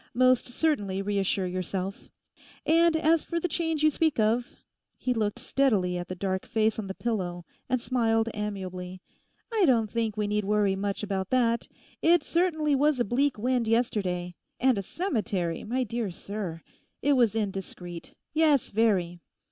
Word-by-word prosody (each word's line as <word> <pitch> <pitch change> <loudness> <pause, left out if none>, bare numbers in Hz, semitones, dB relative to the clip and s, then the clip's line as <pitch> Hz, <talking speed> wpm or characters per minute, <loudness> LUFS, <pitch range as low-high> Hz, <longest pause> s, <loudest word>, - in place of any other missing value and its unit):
Most 255 0 +4
certainly 210 -9 0
reassure 195 -1 0
yourself! 185 +2 -4 0.6
And 330 +1 +4
as 320 0 +3
for 335 - -2
the 360 - -1
change 325 -2 -1
you 310 - +6
speak 315 0 +1
of'—he 235 +3 -2
looked 215 -1 -1
steadily 235 -8 +1
at 175 0 -4
the 185 - -5
dark 190 0 -2
face 220 0 +1
on 205 - -4
the 190 - -5
pillow 180 -7 -3 0.2
and 255 -1 +2
smiled 230 -2 +1
amiably—'I 195 - -4
don't 225 -5 +3
think 225 -2 -1
we 210 - 0
need 210 0 0
worry 205 -1 +2
much 200 +1 -3
about 195 -2 -2
that. 235 -2 +2 0.3
It 345 +1 +4
certainly 320 -4 +1
was 285 0 +3
a 240 - +2
bleak 265 +5 +1
wind 245 +1 0
yesterday—and 210 0 0
a - - -1
cemetery, 200 - -2
my 255 +4 -1
dear 230 -2 -2
sir! 180 -2 -6 0.4
It 285 +2 +4
was 235 -5 +3
indiscreet—yes, 205 - -1
very. 195 -6 +1
220 Hz, 150 wpm, -28 LUFS, 195-260 Hz, 0.6 s, you